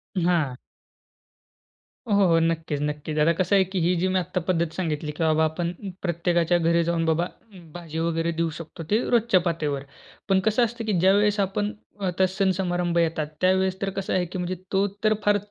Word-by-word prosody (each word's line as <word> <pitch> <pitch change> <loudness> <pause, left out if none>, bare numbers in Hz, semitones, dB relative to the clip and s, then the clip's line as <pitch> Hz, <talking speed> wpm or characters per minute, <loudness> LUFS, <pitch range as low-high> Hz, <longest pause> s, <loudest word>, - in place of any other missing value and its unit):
हां. 165 -8 +1 1.5
हो, 210 - 0
हो, 200 -1 +5
हो. 165 -1 +4
नक्कीच, 165 -3 -1
नक्कीच. 150 +1 -3
आता 155 +3 +4
कसं 185 +2 +2
आहे? 195 - +5
की 190 0 -3
ही 175 +2 +2
जी 185 - +2
मी 185 0 +1
आता 180 0 -2
पद्धत 170 -2 +1
सांगितली 155 -4 -2
की 160 +2 -3
बाबा, 160 0 +3
आपण 170 +2 -2 0.3
प्रत्येकाच्या 170 0 +1
घरी 170 0 +2
जाऊन 165 -1 0
बाबा, 160 +2 +1 0.5
भाजी 165 -2 -6
वगैरे 165 0 0
देऊ 165 -1 +1
शकतो. 165 +1 -8
ते 215 +3 +3
रोजच्या 230 -5 +4
पातळीवर. 145 -4 -2 0.5
पण 190 -1 +4
कसं 220 +3 +3
असतं 230 0 -6
की 215 - 0
ज्यावेळेस 205 +2 +4
आपण 205 +2 -2 0.4
आता 190 +2 +2
सण-समारंभ 180 -3 0
येतात. 160 -2 -1
त्यावेळेस 190 +1 +2
तर 195 - 0
कसं 195 - -3
आहे 185 -1 +1
की 180 +2 -7
म्हणजे 180 +1 -2 0.2
तो 195 +1 +2 0.2
तर 215 0 +4
फार 205 0 +4
175 Hz, 185 wpm, -25 LUFS, 165-190 Hz, 1.5 s, हो